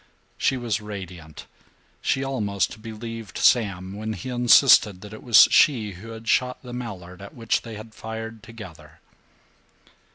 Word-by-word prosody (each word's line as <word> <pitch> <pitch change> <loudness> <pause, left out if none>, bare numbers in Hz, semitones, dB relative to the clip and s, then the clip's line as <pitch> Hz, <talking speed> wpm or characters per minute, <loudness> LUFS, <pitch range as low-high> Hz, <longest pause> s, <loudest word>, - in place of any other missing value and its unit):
She 135 - 0
was 115 -4 -2
radiant; 90 -7 -9 0.6
she 135 - 0
almost 110 -6 -2
believed 115 0 -8
Sam 95 -6 +2
when 110 +1 -4
he 100 +5 -7
insisted 120 -5 +5
that 105 0 -11
it 110 - -10
was 120 -3 +7
she 115 -8 +4
who 95 +4 -12
had 115 0 -10
shot 125 +2 0
the 125 -1 -9
mallard 95 -7 -8
at 100 - -11
which 115 -2 -1
they 115 -2 -9
had 110 +1 -11
fired 110 0 -7
together. 85 -10 -13
110 Hz, 150 wpm, -24 LUFS, 100-120 Hz, 0.6 s, was